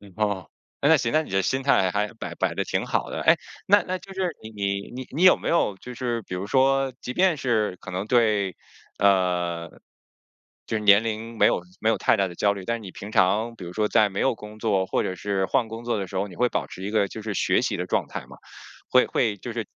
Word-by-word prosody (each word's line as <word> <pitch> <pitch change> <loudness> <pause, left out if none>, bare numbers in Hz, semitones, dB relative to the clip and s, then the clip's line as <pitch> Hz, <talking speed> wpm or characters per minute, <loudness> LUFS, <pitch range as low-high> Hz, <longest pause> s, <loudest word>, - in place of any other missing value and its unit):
哦， 105 -4 -1 0.3
诶， 145 - +3
那 160 - +7
行， 115 -4 -1
那 155 +1 +2
你 - - -12
这 95 0 +2
心 130 +7 -1
态 95 -9 +3
还 105 +2 -1
摆 - - -6
摆 - - 0
得 - - -1
挺 - - -2
好 - - -1
的。 - - -4
诶 - - +6 0.3
那 205 +1 +5
那 185 +1 -3
就 195 +1 -12
是 190 -1 -1
你 110 - -8
你 100 -1 -3
你 130 +1 -7
你 155 +7 -1
有 185 - +8
没 - - -4
有 135 -11 +2
就 125 +5 -9
是 120 -2 -2
比 90 - -6
如 90 +2 -4
说 135 +2 +2
即 125 - -5
便 185 +1 +3
是 110 -8 0
可 - - -9
能 95 +2 -3
对 105 -6 +2 0.4
呃， 90 -4 +1 1.0
就 110 - -1
是 105 - -5
年 100 +1 +6
龄 115 +1 -4
没 - - +6
有 - - +1 0.2
没 110 - +1
有 115 - +2
太 - - +3
大 100 -3 +1
的 90 - -10
焦 100 +2 +2
虑， 100 -2 -8
但 115 - 0
是 - - -11
你 95 -3 -9
平 100 +3 -9
常 110 +3 +2
比 100 - -10
如 85 - -8
说 105 +2 +1
在 105 0 +4
没 100 - -5
有 135 -3 +2
工 105 0 -11
作 100 -4 +1
或 - - 0
者 95 - -3
是 95 +1 -1
换 115 - +1
工 115 +1 -8
作 120 -1 -1
的 100 - -2
时 95 - -10
候， 95 +2 0
你 90 - -12
会 125 - +2
保 - - -2
持 95 - -9
一 100 - -3
个 105 -2 +2
就 110 - -8
是 110 -1 -3
学 - - +2
习 - - 0
的 - - -3
状 - - 0
态 - - -6
吗？ - - -13 0.5
会 125 - +5
会 110 -4 0
就 120 +5 -7
是 115 -1 -4
110 Hz, 280 characters per minute, -25 LUFS, 100-120 Hz, 1.0 s, 有